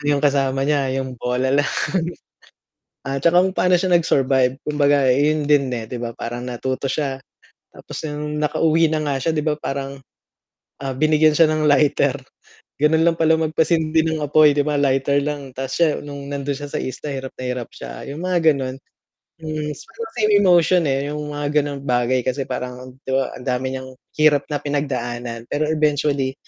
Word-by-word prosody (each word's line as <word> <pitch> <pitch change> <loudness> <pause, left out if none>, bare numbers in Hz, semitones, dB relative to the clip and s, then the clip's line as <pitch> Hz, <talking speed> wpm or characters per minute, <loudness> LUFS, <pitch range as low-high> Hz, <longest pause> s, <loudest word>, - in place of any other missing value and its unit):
yung 145 0 +2
kasama 135 -1 +1
niya 140 -2 +1
yung 130 -1 -3
bola 125 +2 0
lang. 145 0 +2 1.4
At 135 0 -3
saka 175 +2 +5
kung 190 - 0
paano 180 0 +3
siya 180 +1 0
nag-survive 135 -6 +3
kumbaga 145 -2 +2
eh, 145 +4 +3
yun 150 - -2
din 140 -2 +4
eh, 115 - -4
'di 125 - -4
ba 115 -1 -5
parang 120 +1 -5
natuto 130 +2 -3
siya. 135 -1 -2 0.5
Tapos - - -10
yung 150 0 -4
nakauwi 160 +1 +2
na 155 - 0
nga 145 -2 -1
siya 165 - 0
'di 150 -2 -1
ba 150 - 0
parang, 140 -2 -4 0.9
ah, 135 -1 -3
binigyan 155 +2 +3
siya 160 0 +5
ng 155 -1 0
lighter. 145 -2 +3 0.7
Ganun 160 +2 +3
lang 165 - +1
pala 160 -1 +3
magpasindi 160 0 +1
ng 160 -1 -1
apoy, 150 0 +5
'di - - +3
ba, 150 - 0
lighter 135 0 +2
lang, 145 -2 -4
ta's 135 0 -4
siya 165 -3 +3
nung 140 -1 -8
nandun 140 0 -2
siya 145 0 -7
sa - - -1
isla, 130 +3 -5
hirap 135 -1 -6
na - - -5
hirap 125 -2 -4
siya - - -9
yung 145 +4 -6
mga 175 -4 +3
ganun. 130 -2 -4 0.6
Hmm, 155 -1 -4
siguro 225 +10 -12 0.2
may 215 -2 +2
emotion 175 -1 +4
eh, 135 +1 0
yung 150 0 -5
mga 145 +1 +1
ganong 140 -1 -5
bagay 125 0 +1
kasi, 130 +1 -1
parang, 125 0 -6
'di 135 - -4
ba, 135 -1 0
ang 125 - -12
dami 130 0 -1
niyang 130 0 -6 0.3
hirap 150 -2 +4
na 150 - -1
pinagdaanan, 120 -5 -3
pero 150 +1 -1
eventually, 145 -3 +1
145 Hz, 185 wpm, -21 LUFS, 130-155 Hz, 1.4 s, saka